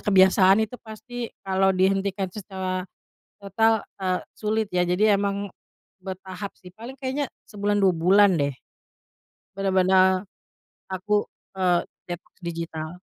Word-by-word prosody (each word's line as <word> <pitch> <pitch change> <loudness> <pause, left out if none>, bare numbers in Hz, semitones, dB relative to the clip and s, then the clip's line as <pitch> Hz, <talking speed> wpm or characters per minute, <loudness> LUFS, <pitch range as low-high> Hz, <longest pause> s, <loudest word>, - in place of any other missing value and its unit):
kebiasaan 190 -1 +5
itu 235 +3 -9
pasti 235 +2 -7 0.2
kalau 190 0 +2
dihentikan 195 0 +1
secara 185 -2 -4 0.5
total, 220 +2 +2 0.2
eee, 185 -1 0 0.2
sulit 220 0 0
ya, 180 -1 +1
jadi 180 +4 +1 0.2
emang 200 -1 -2 0.5
bertahap 190 +1 -7
sih 180 -1 -12
paling 235 +7 -10
kayaknya 270 +2 -1 0.3
sebulan, 205 0 0
2 190 - +6
bulan 200 +3 +6
deh 140 -1 0 1.0
benar-benar 190 -1 +4 0.7
aku, 190 +2 -3 0.4
eee, 180 -2 +2 0.2
detoks 175 +1 -8
digital. 165 0 -5
190 Hz, 115 wpm, -25 LUFS, 185-205 Hz, 1.0 s, 2